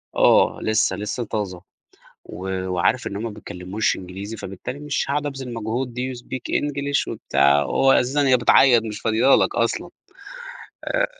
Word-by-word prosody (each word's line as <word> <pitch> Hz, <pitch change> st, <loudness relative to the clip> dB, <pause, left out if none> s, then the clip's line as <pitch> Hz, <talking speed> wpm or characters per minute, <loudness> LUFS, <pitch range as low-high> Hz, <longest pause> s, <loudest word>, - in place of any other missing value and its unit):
آه -, -, +4 dB
لسه، 110 Hz, -3 st, +1 dB
لسه 105 Hz, +5 st, -3 dB
طازة 100 Hz, -5 st, -4 dB, 0.6 s
و 95 Hz, +1 st, -8 dB, 0.2 s
وعارف 95 Hz, +7 st, +1 dB
إن 100 Hz, -, -4 dB
هم 105 Hz, -, -4 dB
ما 115 Hz, -, -3 dB
بيتكلموش 95 Hz, +2 st, -3 dB
إنجليزي 95 Hz, +4 st, -7 dB
فبالتالي 100 Hz, +8 st, -7 dB
مش 150 Hz, -1 st, -2 dB
هاقعد 145 Hz, +1 st, -1 dB
أبذل 135 Hz, -3 st, -5 dB
المجهود 120 Hz, +2 st, -3 dB
Do 130 Hz, +1 st, -2 dB
you 120 Hz, -, -9 dB
speak 130 Hz, 0 st, -5 dB
English؟ 140 Hz, -1 st, -1 dB
وبتاع 70 Hz, +1 st, +2 dB
وهو 135 Hz, -, +3 dB
أساسًا 140 Hz, +3 st, +2 dB
هي 130 Hz, -, +6 dB
بتعيط 120 Hz, 0 st, +5 dB
مش 110 Hz, -2 st, -6 dB
فاضية 115 Hz, +4 st, +3 dB
لك -, -, +2 dB
أصلًا -, -, -1 dB, 0.9 s
آآ، -, -, +1 dB
115 Hz, 160 wpm, -22 LUFS, 100-130 Hz, 0.9 s, هي